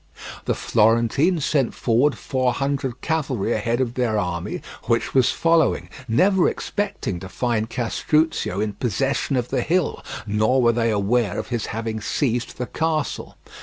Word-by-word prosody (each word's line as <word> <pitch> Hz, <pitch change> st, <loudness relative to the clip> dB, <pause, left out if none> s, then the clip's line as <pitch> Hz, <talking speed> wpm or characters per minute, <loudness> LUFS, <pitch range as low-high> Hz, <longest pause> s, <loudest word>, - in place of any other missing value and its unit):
The -, -, 0 dB
Florentines 115 Hz, -, +2 dB
sent 135 Hz, -6 st, +1 dB
forward 125 Hz, +5 st, +2 dB
four 130 Hz, -2 st, 0 dB
hundred 135 Hz, -3 st, -2 dB
cavalry 135 Hz, -9 st, -1 dB
ahead 115 Hz, +3 st, 0 dB
of 125 Hz, -3 st, 0 dB
their 120 Hz, -4 st, 0 dB
army 90 Hz, -4 st, -3 dB, 0.2 s
which 115 Hz, -, 0 dB
was 130 Hz, -3 st, +4 dB
following, 165 Hz, -2 st, +2 dB, 0.2 s
never 185 Hz, -, +3 dB
expecting 200 Hz, -, -3 dB
to 95 Hz, -, -8 dB
find 115 Hz, 0 st, -1 dB
Castruccio 145 Hz, -, 0 dB
in 105 Hz, 0 st, -1 dB
possession 135 Hz, +5 st, -1 dB
of 125 Hz, -1 st, -1 dB
the -, -, 0 dB
hill, 175 Hz, +1 st, 0 dB, 0.2 s
nor 110 Hz, +5 st, +2 dB
were 120 Hz, -2 st, +5 dB
they 115 Hz, 0 st, +1 dB
aware 105 Hz, 0 st, +1 dB
of -, -, -4 dB
his 120 Hz, -3 st, -2 dB
having 110 Hz, 0 st, -3 dB
seized 120 Hz, -1 st, -1 dB
the 125 Hz, -, -2 dB
castle. 160 Hz, +2 st, -2 dB
120 Hz, 150 wpm, -22 LUFS, 110-140 Hz, 0.2 s, were